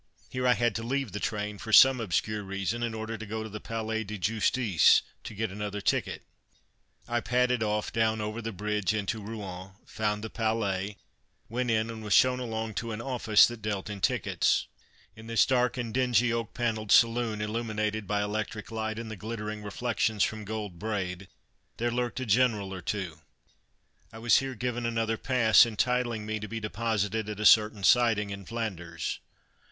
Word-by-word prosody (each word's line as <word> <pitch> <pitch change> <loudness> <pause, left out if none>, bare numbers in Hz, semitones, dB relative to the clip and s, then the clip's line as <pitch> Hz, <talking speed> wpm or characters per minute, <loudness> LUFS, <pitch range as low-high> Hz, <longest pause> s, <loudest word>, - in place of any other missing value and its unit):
Here 125 0 -1
I 125 - +5
had 120 -2 +1
to - - -4
leave 130 0 -2
the 105 - -4
train, 105 -1 -3
for 110 - -6
some 130 +2 +8
obscure 105 +1 -1
reason, 100 +4 -3
in 115 -1 -2
order 110 0 -5
to - - -6
go 110 +1 -4
to 110 - -7
the 105 +1 -7
Palais 110 0 -3
de 105 0 -6
Justice 105 -1 +3 0.2
to 110 - -8
get 110 -1 -2
another 105 0 -4
ticket. - - -1 0.8
I 120 0 0
padded 125 0 +1
off 105 -1 -1
down 110 -1 +1
over 105 +2 -3
the 115 0 -4
bridge 105 +1 -1
into 105 +1 -2
Rouen, 95 -3 -7
found 105 -1 -2
the 110 - -4
Palais, 105 -3 -1 0.5
went 125 +2 -1
in 110 0 +1
and 110 -1 -8
was 105 -2 0
shown 125 0 +5
along 110 -2 -3
to 115 -1 -5
an 105 - -5
office 115 -3 +4
that 120 -2 -5
dealt 105 -1 -3
in 100 -2 -7
tickets. - - +1 0.5
In 110 +1 -12
this 115 0 +4
dark 125 -1 +1
and 115 -3 -3
dingy 125 -2 +2
oak 115 -1 -3
panelled 110 -3 -1
saloon, 115 -2 +4
illuminated 110 -1 -2
by 105 +1 0
electric 105 +1 -4
light 110 -1 -3
and 115 -1 -6
the - - -5
glittering 105 +1 -5
reflections 110 0 0
from 110 -1 -2
gold 105 -4 -5
braid, 95 -3 -3 0.5
there 120 +1 0
lurked 120 +1 -2
a 130 - -3
general 110 -4 +2
or 95 - -6
two. 90 -6 -4 0.9
I 110 - -10
was 115 +1 +4
here 135 -1 -4
given 120 +1 -3
another 115 -1 -1
pass 115 -4 +5
entitling 120 -1 0
me 110 0 -3
to 105 - -6
be 115 +2 -4
deposited 110 -1 -1
at 105 -1 -5
a 105 - -2
certain 105 -2 +5
siding 110 -2 +4
in 100 -1 -7
Flanders. 105 -7 -4
110 Hz, 185 wpm, -28 LUFS, 105-115 Hz, 0.9 s, some